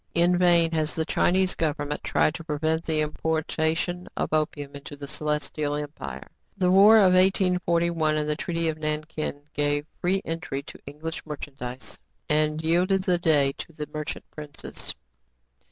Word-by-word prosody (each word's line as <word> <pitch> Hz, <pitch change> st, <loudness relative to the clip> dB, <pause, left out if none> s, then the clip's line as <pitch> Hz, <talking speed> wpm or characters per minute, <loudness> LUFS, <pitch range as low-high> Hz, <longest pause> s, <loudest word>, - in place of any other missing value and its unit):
In 175 Hz, +1 st, +4 dB
vain 175 Hz, -2 st, +4 dB
has 155 Hz, -1 st, -1 dB
the 160 Hz, -, 0 dB
Chinese 185 Hz, +2 st, +2 dB
government 150 Hz, -2 st, -2 dB
tried 155 Hz, -, +2 dB
to 165 Hz, -, -7 dB
prevent 160 Hz, +1 st, -1 dB
the 155 Hz, -1 st, +1 dB
importation 160 Hz, +3 st, -1 dB
of -, -, -1 dB
opium 150 Hz, -2 st, -1 dB
into 140 Hz, +1 st, -8 dB
the 140 Hz, 0 st, -8 dB
Celestial 150 Hz, 0 st, -2 dB
Empire. 105 Hz, -, -6 dB, 0.3 s
The 180 Hz, -2 st, +3 dB
war 205 Hz, +4 st, +8 dB
of 190 Hz, -4 st, +6 dB
1841 170 Hz, -4 st, +2 dB
and 150 Hz, 0 st, -1 dB
the 150 Hz, -, 0 dB
treaty 165 Hz, +1 st, -2 dB
of 155 Hz, -1 st, -2 dB
Nankin 155 Hz, -1 st, -3 dB
gave 145 Hz, 0 st, +1 dB, 0.2 s
free 190 Hz, +2 st, +1 dB
entry 160 Hz, -4 st, -3 dB
to -, -, -11 dB
English 155 Hz, +3 st, -6 dB
merchandise, 135 Hz, -4 st, -7 dB, 0.3 s
and 155 Hz, +1 st, +1 dB
yielded 180 Hz, +4 st, +2 dB
the 180 Hz, -2 st, +2 dB
day 150 Hz, -5 st, +3 dB
to 165 Hz, -, -8 dB
the 150 Hz, -1 st, -5 dB
merchant 155 Hz, +1 st, -5 dB
princes. 150 Hz, -2 st, -7 dB
155 Hz, 155 wpm, -26 LUFS, 150-170 Hz, 0.3 s, war